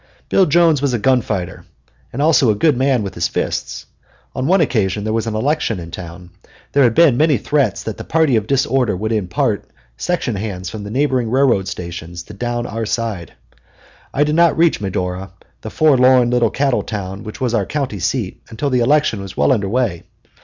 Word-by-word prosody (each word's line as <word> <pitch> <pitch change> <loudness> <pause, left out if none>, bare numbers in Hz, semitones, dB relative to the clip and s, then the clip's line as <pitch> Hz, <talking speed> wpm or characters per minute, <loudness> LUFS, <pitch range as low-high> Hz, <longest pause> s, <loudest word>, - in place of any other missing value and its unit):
Bill 190 - +4
Jones 165 -2 +3
was 140 -4 +1
a - - +1
gun 125 +3 +2
fighter 95 -5 -4 0.5
and 140 +4 -2
also 150 -5 +4
a 105 - +3
good 150 +6 +2
man 130 -2 +1
with 100 - -5
his 85 - -1
fists. - - -3 0.5
On 130 +1 -2
one 190 +3 +4
occasion 105 - 0
there 110 +1 -2
was 115 0 -1
an 110 - -2
election 115 - 0
in 85 -1 -9
town. 90 0 -9 0.4
There 140 - +3
had 120 -4 +3
been 155 -8 +5
many 150 -2 +3
threats 130 -2 0
that 110 - -5
the - - -5
party 160 -5 +2
of 110 -1 0
disorder 135 -5 +1
would 110 +4 -3
import 100 -6 -1 0.3
section 150 - -1
hands 95 -3 -5
from 110 -2 -7
the 100 - -7
neighboring 130 -1 0
railway 125 -6 +2
stations 85 -2 -7
to 105 - -12
down 120 +3 -3
our 115 -1 -4
side. 105 -9 -3 0.8
I 145 - +2
did 150 0 0
not 170 +1 +4
reach 165 -6 +3
Medora, 90 -1 -3 0.3
the 110 - -6
forlorn 130 -3 +4
little 120 -2 +2
cattle 135 +2 0
town 95 -2 -6
which 110 +3 -9
was 125 -3 -1
our 105 -5 0
county 135 -9 -3
seat, 100 +2 -2
until 135 +5 -3
the 125 - +2
election 125 -4 +2
was 95 -1 -9
well - - +3
under 100 -6 0
way. 115 -7 -1
115 Hz, 200 wpm, -18 LUFS, 100-135 Hz, 0.8 s, been